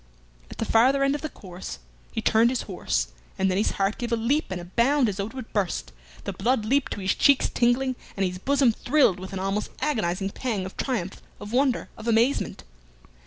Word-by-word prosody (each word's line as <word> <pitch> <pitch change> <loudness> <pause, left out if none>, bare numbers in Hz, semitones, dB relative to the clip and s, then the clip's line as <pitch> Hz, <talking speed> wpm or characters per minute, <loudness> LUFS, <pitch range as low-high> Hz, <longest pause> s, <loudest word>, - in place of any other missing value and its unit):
At - - -10
the - - -1
farther 260 +6 +4
end 275 0 +3
of 290 - -3
the 310 - -3
course 180 - -8 0.3
he - - -3
turned 225 +2 +4
his 255 -1 -1
horse, - - -1 0.3
and 190 -1 +2
then 185 - 0
his 210 - +1
heart 195 +2 0
gave 240 -1 -3
a - - +4
leap 250 +7 +1
and 185 -1 -3
a 175 - -8
bound 245 +8 +3
as 200 -3 -2
though 200 0 -2
it 225 - -12
would 255 -4 -8
burst, 200 -4 -1 0.3
the - - -4
blood 240 -3 +1
leaped 275 +5 +1
to 205 - -6
his 190 0 +2
cheeks 280 -2 +4
tingling, 250 +2 +2 0.2
and 195 - +2
his 180 0 -3
bosom 275 +2 +3
thrilled 245 -5 +2
with 190 +1 -8
an 195 - -4
almost 195 +2 -1
agonizing 195 -9 -1
pang 215 -7 -2
of 190 - -8
triumph, 215 -9 -3 0.2
of 205 +2 -8
wonder, 260 0 +2
of 220 - -8
amazement. 235 +4 +1
225 Hz, 215 wpm, -25 LUFS, 195-260 Hz, 0.3 s, farther